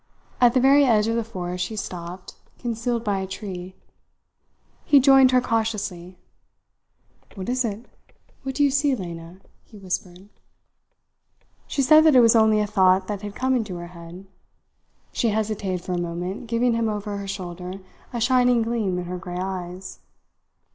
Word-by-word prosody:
At 245 Hz, 0 st, +5 dB
the -, -, +5 dB
very 275 Hz, +3 st, +5 dB
edge 220 Hz, -5 st, +3 dB
of 225 Hz, +1 st, 0 dB
the 230 Hz, -, 0 dB
forest 180 Hz, -4 st, -4 dB
she 220 Hz, -, -5 dB
stopped, 180 Hz, -2 st, -7 dB, 0.2 s
concealed 235 Hz, 0 st, -2 dB
by 205 Hz, -3 st, -1 dB
a 190 Hz, -, -4 dB
tree. 185 Hz, -2 st, -7 dB, 1.1 s
He 285 Hz, -, +5 dB
joined 270 Hz, -1 st, +6 dB
her 255 Hz, 0 st, +4 dB
cautiously. 210 Hz, -6 st, -3 dB, 1.2 s
"What 190 Hz, -2 st, -6 dB
is 255 Hz, +1 st, +1 dB
it? 225 Hz, +1 st, -4 dB, 0.6 s
What 265 Hz, -1 st, -5 dB
do 290 Hz, -, +2 dB
you 285 Hz, -, +3 dB
see, 280 Hz, 0 st, +2 dB
Lena?" 170 Hz, -2 st, -8 dB, 0.2 s
he 215 Hz, -, -16 dB
whispered. 185 Hz, 0 st, -6 dB, 1.4 s
She 275 Hz, -, -1 dB
said 310 Hz, +3 st, +7 dB
that 310 Hz, -4 st, +6 dB
it -, -, +8 dB
was 230 Hz, 0 st, +5 dB
only 220 Hz, -1 st, +4 dB
a -, -, +1 dB
thought 190 Hz, -2 st, +3 dB
that 205 Hz, -2 st, -3 dB
had 205 Hz, -1 st, -7 dB
come 260 Hz, 0 st, +1 dB
into 215 Hz, -7 st, -2 dB
her 175 Hz, 0 st, -7 dB
head. 170 Hz, +2 st, -11 dB, 0.9 s
She 235 Hz, -, 0 dB
hesitated 205 Hz, -4 st, -2 dB
for -, -, -4 dB
a 175 Hz, -, -1 dB
moment 175 Hz, +6 st, -5 dB
giving 235 Hz, +1 st, +1 dB
him 230 Hz, -1 st, 0 dB
over 205 Hz, -1 st, -4 dB
her 200 Hz, 0 st, -6 dB
shoulder 180 Hz, -2 st, -6 dB, 0.4 s
a 240 Hz, -, -3 dB
shining 245 Hz, 0 st, +3 dB
gleam 225 Hz, -5 st, -1 dB
in 180 Hz, -, -4 dB
her 180 Hz, +1 st, -5 dB
grey 175 Hz, 0 st, -7 dB
eyes. 185 Hz, 0 st, -6 dB
210 Hz, 170 wpm, -23 LUFS, 185-235 Hz, 1.4 s, it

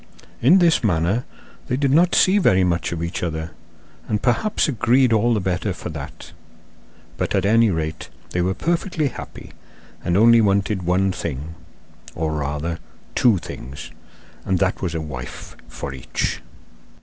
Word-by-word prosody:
In 145 Hz, +11 st, +6 dB
this 170 Hz, -6 st, +3 dB
manner 95 Hz, +4 st, +1 dB, 0.4 s
they 125 Hz, -, 0 dB
did 140 Hz, -1 st, +1 dB
not 170 Hz, +5 st, +4 dB
see 195 Hz, +2 st, +5 dB
very 95 Hz, -, +4 dB
much 85 Hz, -2 st, 0 dB
of 85 Hz, -1 st, -3 dB
each 85 Hz, +1 st, -3 dB
other 80 Hz, -1 st, -3 dB, 0.6 s
and 105 Hz, -, 0 dB
perhaps 150 Hz, -, +1 dB
agreed 125 Hz, -1 st, +3 dB
all 115 Hz, +2 st, +3 dB
the -, -, +1 dB
better 95 Hz, +1 st, -1 dB
for 85 Hz, -, -7 dB
that; 75 Hz, -3 st, -9 dB, 0.9 s
but -, -, -1 dB
at 95 Hz, -1 st, +1 dB
any 115 Hz, +2 st, +4 dB
rate 80 Hz, -2 st, -3 dB, 0.2 s
they 90 Hz, -, 0 dB
were 95 Hz, +2 st, 0 dB
perfectly 170 Hz, -3 st, -1 dB
happy, -, -, -10 dB, 0.5 s
and 85 Hz, +1 st, +1 dB
only 115 Hz, +2 st, +6 dB
wanted 100 Hz, -1 st, +1 dB
one 90 Hz, +2 st, +1 dB
thing, 80 Hz, -3 st, -5 dB, 0.6 s
or, 80 Hz, -1 st, -1 dB
rather, 75 Hz, +3 st, -3 dB, 0.3 s
two 115 Hz, -5 st, +4 dB
things, 70 Hz, -5 st, -8 dB, 0.5 s
and 95 Hz, -, 0 dB
that 95 Hz, +1 st, 0 dB
was 85 Hz, -3 st, -2 dB
a 80 Hz, -, -2 dB
wife 65 Hz, -5 st, -8 dB
for 70 Hz, -, -6 dB
each. 65 Hz, -2 st, -3 dB
95 Hz, 155 wpm, -21 LUFS, 80-120 Hz, 0.9 s, In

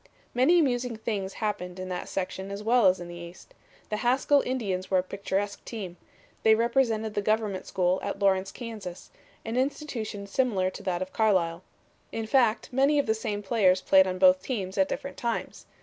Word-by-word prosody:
"Many 260 Hz, +8 st, +4 dB
amusing 250 Hz, -6 st, +1 dB
things 200 Hz, -3 st, -3 dB
happened 185 Hz, -4 st, -3 dB
in 185 Hz, 0 st, -5 dB
that 180 Hz, -1 st, -4 dB
section 190 Hz, 0 st, -4 dB
as 200 Hz, +1 st, -6 dB
well 230 Hz, -1 st, +4 dB
as 185 Hz, 0 st, +3 dB
in 175 Hz, -, -7 dB
the 175 Hz, -, -8 dB
East. 175 Hz, +1 st, -11 dB, 0.4 s
The 210 Hz, -, -1 dB
Haskell 260 Hz, +4 st, +3 dB
Indians 200 Hz, -8 st, -2 dB
were 190 Hz, -, +3 dB
a 180 Hz, -, +2 dB
picturesque 200 Hz, +1 st, -3 dB
team. 195 Hz, -7 st, -6 dB, 0.5 s
They 220 Hz, 0 st, +6 dB
represented 230 Hz, -2 st, +1 dB
the 205 Hz, -, 0 dB
Government 210 Hz, -2 st, -1 dB
School 185 Hz, 0 st, +1 dB
at 200 Hz, -, -3 dB
Lawrence, 195 Hz, -1 st, +2 dB
Kansas 215 Hz, -7 st, -8 dB, 0.3 s
an 225 Hz, +2 st, -3 dB
institution 255 Hz, -7 st, -2 dB
similar 200 Hz, -4 st, 0 dB
to -, -, -9 dB
that 185 Hz, -2 st, -1 dB
of 185 Hz, -, -11 dB
Carlisle. 185 Hz, -6 st, +2 dB, 0.5 s
In 225 Hz, -1 st, -3 dB
fact, 225 Hz, -2 st, +2 dB
many 275 Hz, +3 st, +3 dB
of 285 Hz, -, +2 dB
the 220 Hz, -, +2 dB
same 215 Hz, -2 st, -4 dB
players 190 Hz, -3 st, +3 dB
played 190 Hz, 0 st, +5 dB
on 185 Hz, 0 st, -2 dB
both 185 Hz, 0 st, +5 dB
teams 195 Hz, -7 st, -4 dB
at 190 Hz, -1 st, +2 dB
different 275 Hz, 0 st, -5 dB
times. 235 Hz, -1 st, -4 dB
205 Hz, 185 wpm, -27 LUFS, 185-235 Hz, 0.5 s, They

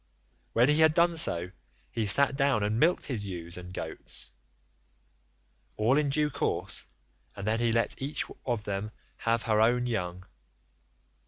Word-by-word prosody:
When 120 Hz, +2 st, +4 dB
he 150 Hz, +1 st, +3 dB
had 160 Hz, -1 st, +5 dB
so 170 Hz, -, +2 dB
done 90 Hz, -, -14 dB, 0.4 s
he 115 Hz, -3 st, -1 dB
sat 135 Hz, +7 st, +5 dB
down 135 Hz, -6 st, +2 dB
and 105 Hz, +2 st, 0 dB
milked 170 Hz, +6 st, +3 dB
his 120 Hz, -7 st, -3 dB
ewes 85 Hz, -3 st, -6 dB
and 90 Hz, 0 st, -9 dB
goats, -, -, -5 dB, 1.5 s
all 115 Hz, +5 st, +3 dB
in 150 Hz, -1 st, +2 dB
due 150 Hz, +1 st, +1 dB
course, -, -, -3 dB, 0.5 s
and 100 Hz, -, -6 dB
then 115 Hz, +2 st, +1 dB
let 115 Hz, +3 st, 0 dB
each 140 Hz, +3 st, -2 dB, 0.2 s
of 120 Hz, -4 st, -2 dB
them 100 Hz, +1 st, -3 dB, 0.3 s
have 115 Hz, 0 st, 0 dB
her 110 Hz, -2 st, +2 dB
own 120 Hz, +2 st, +3 dB
young. 90 Hz, -6 st, -3 dB
115 Hz, 150 wpm, -29 LUFS, 100-140 Hz, 1.5 s, had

